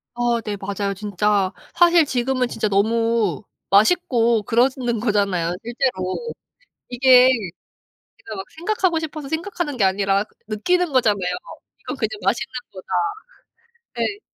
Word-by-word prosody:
아 240 -1 0
네 210 -2 -3
맞아요 200 0 -3
진짜. 205 -1 0 0.2
사실 345 -2 +5
지금은 255 -1 0
진짜 225 -2 -2
너무 220 -1 +1 0.3
맛있고 235 - +3
그러시는 245 +1 +1
거잖아요 200 -6 0
실제로. 235 - -2 0.6
이게 250 0 +6
내가 205 -9 -2 0.7
막 190 - -5
생각하고 350 -1 0
싶어서 310 -2 -6
생각하는 325 -2 -3
게 215 - +2
아니라 195 +1 +2
그 - - -31
느끼는 350 +10 0
거잖아요. 225 -6 +3 0.6
'이건 - - -6
그냥 220 -5 -1
맛있는 195 +5 0 0.2
거다.' 185 -1 -11 1.2
예. 410 0 -2
230 Hz, 285 characters per minute, -21 LUFS, 200-270 Hz, 1.2 s, 이게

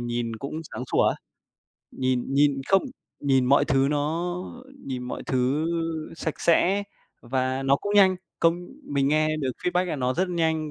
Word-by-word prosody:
nhìn 120 -1 -3
cũng 140 +7 -5
sáng 125 - -5
sủa - - +4
á, - - 0 0.8
nhìn 130 -1 0
nhìn 140 -1 +3
không, 195 0 +4 0.4
nhìn 135 -2 +3
mọi 140 +3 +4
thứ 135 +1 +2
nó 160 +4 -1 0.5
nhìn 130 -2 -4
mọi 125 - -5
thứ 130 +4 +1 0.5
sạch 160 -2 -4
sẽ 185 +4 +3 0.4
và 130 +1 -1
nó 135 +1 +3
cũng 205 +7 -3
nhanh. 190 -2 +6 0.2
Công 170 +1 +2 0.2
mình 140 -1 0
nghe 155 +1 +2
được 140 -4 -1
feedback 180 +1 +2
là 175 -4 -3
nó 130 -1 0
rất 185 +1 0
nhanh 160 -3 0
145 Hz, 170 wpm, -25 LUFS, 130-170 Hz, 0.8 s, nhanh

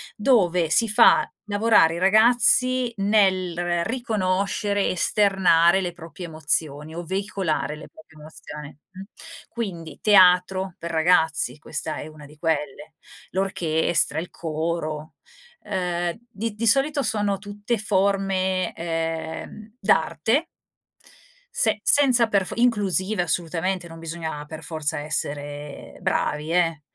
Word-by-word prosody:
dove 180 - +2
si 230 +5 +4
fa 230 +3 +5 0.2
lavorare 205 -6 +3
i 170 - -4
ragazzi 240 +4 +4
nel 185 -4 +1
riconoscere, 205 -3 -1
esternare 190 -2 +3
le 175 -1 -3
proprie 170 0 -10
emozioni, 155 -1 -1
o 175 - -5
veicolare 190 -4 -2
le 150 - -12
proprie 160 0 -18
emozioni, 150 -1 -10 0.2
mh. 190 - -11 0.5
Quindi 185 -9 -6
teatro 185 -2 +4
per 170 0 -6
ragazzi 160 -2 +1
questa 155 0 -4
è - - -7
una 155 -1 -13
di 150 +1 -16
quelle, 150 -1 -3 0.4
l'orchestra, 170 -4 0
il 175 - -6
coro, 155 -1 -4 0.5
ehm, 175 -1 -2
di 220 -1 -4
di 230 +1 -1
solito 280 +4 +3
sono 205 -2 0
tutte 205 +3 -4
forme, 195 -2 0
ehm, 165 +5 -5
d'arte 220 - +1 1.1
se - - +2
senza 255 -5 +5
per 200 -3 +1
fo - - -4
inclusive 205 -5 +1
assolutamente, 175 +2 -2
non 165 0 -11
bisogna 160 -2 -6
per 160 +1 -9
forza 155 -1 -3
essere 145 -1 -5
bravi 150 +2 -1
eh 165 -3 +1
180 Hz, 115 wpm, -23 LUFS, 160-205 Hz, 1.1 s, fa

